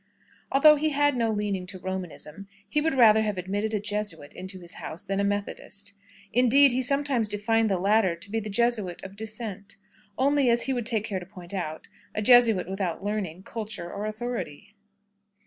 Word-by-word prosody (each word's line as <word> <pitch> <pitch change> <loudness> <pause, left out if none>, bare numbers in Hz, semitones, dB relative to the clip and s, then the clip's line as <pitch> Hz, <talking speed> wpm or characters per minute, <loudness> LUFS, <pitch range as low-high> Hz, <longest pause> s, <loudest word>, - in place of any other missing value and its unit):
Although 300 +2 +7
he 310 +2 +1
had 290 -1 +2
no 230 -2 +1
leaning 205 -4 -2
to 190 - -6
Romanism, 185 -1 -6 0.2
he 300 - +1
would 320 -2 0
rather 220 -4 +6
have 210 -3 -1
admitted 200 +4 -2
a - - +1
Jesuit 205 -8 -4
into 185 +1 -7
his 175 -1 -7
house 160 - -7
than 195 0 -2
a - - +2
Methodist. 205 0 -3 0.4
Indeed, 255 +4 +6
he 250 +2 0
sometimes 275 -4 +1
defined 220 +2 +1
the 190 - +1
latter 195 -1 +3
to 170 +4 -8
be 225 - 0
the 215 -1 -6
Jesuit 210 -4 0
of 190 +1 -9
dissent 210 -2 -6 0.4
only, 275 0 +3
as 235 0 +2
he 265 - -1
would 240 -3 -2
take 225 -3 0
care 200 -4 -3
to 180 - -10
point 180 0 -11
out, 160 -5 -4 0.3
a 215 - 0
Jesuit 230 -6 +6
without 190 -2 -3
learning, 195 -4 -3
culture, 215 -6 -6
or 205 +1 -3
authority. 215 -4 -5
210 Hz, 185 wpm, -26 LUFS, 190-235 Hz, 0.4 s, Although